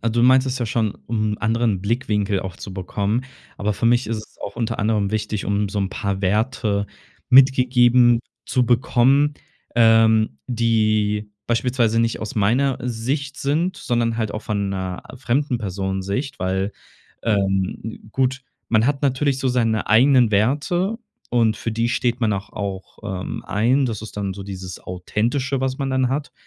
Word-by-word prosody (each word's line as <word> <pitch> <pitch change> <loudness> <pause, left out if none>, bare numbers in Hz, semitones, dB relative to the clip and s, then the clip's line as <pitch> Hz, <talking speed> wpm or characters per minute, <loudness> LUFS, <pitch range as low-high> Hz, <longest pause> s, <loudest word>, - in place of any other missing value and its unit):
a 115 - 0
du 120 +1 +1
meintest 130 0 +4
ja 120 - -1
schon, 110 -2 0
um 110 -2 0
'n - - -10
anderen 115 -4 +1
Blickwinkel 105 -3 0
auch 95 -1 -6
zu 95 - -8
bekommen. 100 +5 -1 0.3
Aber 105 +1 -1
für 115 - -1
mich 120 -1 +3
ist 115 - -1
es 105 - -11
auch 100 +2 -6
unter 115 -1 -2
anderem 105 -2 +1
wichtig, 105 -1 -2
um 100 0 0
so 100 +1 -3
'n 100 - 0
paar 100 -1 -3
Werte 100 0 0 0.4
mitgegeben 125 -2 +5 0.3
zu 125 -2 +1
bekommen, 130 +4 +3 0.4
ähm, 110 -6 +4
die 110 -3 +1 0.2
beispielsweise 120 -1 +1
nicht 115 0 0
aus 105 - -6
meiner 125 +6 +2
Sicht 130 +4 -3
sind, 165 +7 0
sondern 120 -5 -1
halt 110 -2 -2
auch 105 - -4
von 100 -3 -2
'ner 95 -2 -4
fremden 130 +1 0
Personensicht. 100 +5 -3
Weil, 95 +2 -1 0.5
ähm, 100 0 -1
gut, 130 +1 0 0.3
man 110 0 +3
hat 145 0 0
natürlich 135 0 +1
so 135 - -2
seine 115 -3 +1
eigenen 120 +1 +5
Werte 150 - +1 0.3
und 115 -3 +2
für 115 - -3
die 115 +1 0
steht 120 0 0
man 110 -3 +2
auch 100 +1 -4
auch, 100 -2 -6 0.2
ähm, - - -6
ein. 125 +7 +2
Das 110 -2 -4
ist 110 - -9
dann 100 -2 -2
so 100 - -7
dieses 95 -2 -7
Authentische, 120 +9 -2
was 130 +1 -1
man 135 - -1
dann 130 -1 +1
hat. 140 +3 -3
115 Hz, 165 wpm, -21 LUFS, 105-125 Hz, 0.5 s, mitgegeben